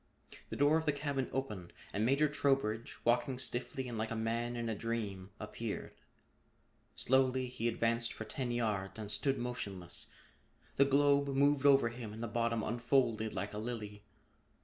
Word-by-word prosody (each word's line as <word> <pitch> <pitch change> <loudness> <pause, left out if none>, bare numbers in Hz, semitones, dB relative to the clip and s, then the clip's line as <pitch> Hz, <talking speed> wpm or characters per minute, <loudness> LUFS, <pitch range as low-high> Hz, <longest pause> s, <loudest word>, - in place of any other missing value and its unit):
The - - -4
door 145 +3 +4
of 160 -1 -3
the - - +5
cabin 140 -2 -2
opened 105 -10 -4 0.2
and 105 - 0
Major 140 +6 +4
Trowbridge, 135 -6 0
walking 120 +2 +2
stiffly 130 +1 -3
and 115 -3 -4
like 110 0 -1
a 115 - -3
man 115 +2 -1
in 120 -1 -2
a 115 - 0
dream, 105 -4 -3
appeared. 105 +1 -5 1.0
Slowly 130 0 +3
he 125 -2 -2
advanced 115 0 +1
for 110 - -6
ten 125 +3 -3
yards 105 -5 -1
and 105 -2 -4
stood 135 +6 +1
motionless. 100 -8 -3 0.7
The 140 - +6
globe 140 +1 +4
moved 140 +1 +3
over 135 -4 +6
him 115 -2 -7
and 110 +2 -6
the - - -1
bottom 115 0 0
unfolded 120 -2 +1
like 105 +1 -3
a 105 - -3
lily. 105 -3 -5
120 Hz, 165 wpm, -34 LUFS, 110-135 Hz, 1.0 s, The